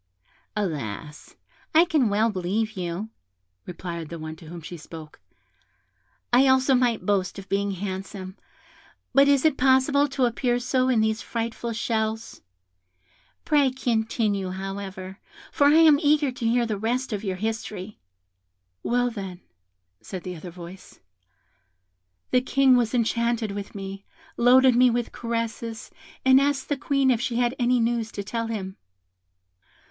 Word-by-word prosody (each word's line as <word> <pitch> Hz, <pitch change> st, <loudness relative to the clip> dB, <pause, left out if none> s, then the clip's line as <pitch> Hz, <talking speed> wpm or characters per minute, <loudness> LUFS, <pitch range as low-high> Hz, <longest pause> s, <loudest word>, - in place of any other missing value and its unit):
"Alas! 150 Hz, -, -5 dB, 0.4 s
I 330 Hz, +2 st, +7 dB
can 295 Hz, -9 st, +2 dB
well 215 Hz, +3 st, +2 dB
believe 205 Hz, +4 st, -1 dB
you," 185 Hz, +2 st, -5 dB, 0.6 s
replied 170 Hz, -2 st, -6 dB
the 170 Hz, -, -6 dB
one 155 Hz, 0 st, -7 dB
to 160 Hz, -, -14 dB
whom 170 Hz, +2 st, -8 dB
she 165 Hz, +2 st, -8 dB
spoke; 160 Hz, -1 st, -11 dB, 1.1 s
"I 260 Hz, +3 st, +6 dB
also 260 Hz, +1 st, +4 dB
might 245 Hz, -3 st, +1 dB
boast 200 Hz, -2 st, 0 dB
of 195 Hz, 0 st, -9 dB
being 200 Hz, 0 st, 0 dB
handsome, 190 Hz, 0 st, -6 dB, 0.8 s
but 275 Hz, +1 st, +6 dB
is 280 Hz, 0 st, +3 dB
it 310 Hz, -3 st, +3 dB
possible 265 Hz, +2 st, +4 dB
to 270 Hz, -2 st, 0 dB
appear 240 Hz, +1 st, 0 dB
so 255 Hz, +1 st, +1 dB
in 235 Hz, -4 st, +3 dB
these 220 Hz, 0 st, 0 dB
frightful 230 Hz, 0 st, -4 dB
shells? 220 Hz, 0 st, -2 dB, 1.0 s
Pray 290 Hz, -3 st, +4 dB
continue, 220 Hz, -6 st, -1 dB
however, 190 Hz, 0 st, -6 dB, 0.3 s
for 285 Hz, -, +3 dB
I 295 Hz, -, +5 dB
am 315 Hz, -3 st, +7 dB
eager 290 Hz, -2 st, +3 dB
to 245 Hz, -2 st, -3 dB
hear 240 Hz, +1 st, +2 dB
the 215 Hz, -3 st, -3 dB
rest 245 Hz, +3 st, -1 dB
of 205 Hz, 0 st, -3 dB
your 190 Hz, -3 st, -2 dB
history." 215 Hz, -1 st, -5 dB, 0.8 s
"Well, 245 Hz, 0 st, +1 dB
then," 190 Hz, -5 st, -7 dB, 0.6 s
said 185 Hz, -3 st, -7 dB
the 180 Hz, -1 st, -5 dB
other 170 Hz, +2 st, -8 dB
voice, 175 Hz, +2 st, -12 dB, 1.3 s
"the 250 Hz, -, +4 dB
King 265 Hz, 0 st, +4 dB
was 240 Hz, 0 st, +1 dB
enchanted 235 Hz, -1 st, 0 dB
with 200 Hz, 0 st, -7 dB
me, 195 Hz, 0 st, -7 dB, 0.3 s
loaded 255 Hz, +1 st, +5 dB
me 250 Hz, +1 st, +6 dB
with 240 Hz, 0 st, -1 dB
caresses, 230 Hz, -1 st, -4 dB, 0.3 s
and 260 Hz, +1 st, +7 dB
asked 280 Hz, -1 st, 0 dB
the 290 Hz, -, +1 dB
Queen 275 Hz, 0 st, +2 dB
if 235 Hz, -2 st, +1 dB
she 240 Hz, -1 st, -2 dB
had 240 Hz, 0 st, +1 dB
any 245 Hz, 0 st, +3 dB
news 230 Hz, -1 st, 0 dB
to 200 Hz, -, -4 dB
tell 230 Hz, +3 st, -3 dB
him. 195 Hz, -4 st, -5 dB
225 Hz, 145 wpm, -25 LUFS, 195-255 Hz, 1.3 s, I